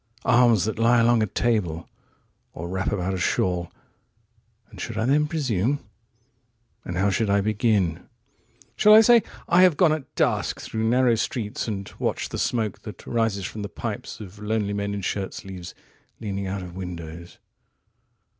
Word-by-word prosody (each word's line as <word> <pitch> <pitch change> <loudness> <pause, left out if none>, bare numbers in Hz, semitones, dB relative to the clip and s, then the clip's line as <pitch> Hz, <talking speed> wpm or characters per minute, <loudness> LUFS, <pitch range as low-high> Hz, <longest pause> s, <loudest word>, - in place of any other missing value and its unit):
67Arms 120 -6 +4
that 110 0 -3
lie 120 +1 +4
along 115 0 +4
a 110 - +1
table, 95 -8 -1 0.7
or 85 - -6
wrap 95 +2 -2
about 95 -2 -1
a 95 - -3
shawl.68 90 0 -5
And - - -10
should - - -5
I 110 - 0
then 150 +4 +3
presume?69 135 - 0 1.1
And 90 - -4
how 100 +2 +2
should 110 +1 0
I 100 0 +3
begin?70Shall 105 - 0
I - - +9
say, 235 +1 +6 0.3
I 175 +2 +5
have 180 -5 +5
gone 170 -4 +5
at 155 -4 -6
dusk - - 0
through 110 0 -3
narrow 125 0 +4
streets71And 105 -3 -3
watched - - -2
the - - -3
smoke 110 -5 -1
that 105 - -10
rises 115 -5 0
from 105 - -6
the 100 - -5
pipes72Of 100 +2 -6
lonely 105 -1 -1
men 100 0 -2
in 100 - -4
shirt 95 0 -3
sleeves, 95 -2 -8 0.4
leaning 100 -3 -4
out 95 0 -3
of 90 -1 -9
windows? 85 -2 -8
105 Hz, 155 wpm, -24 LUFS, 95-120 Hz, 1.1 s, I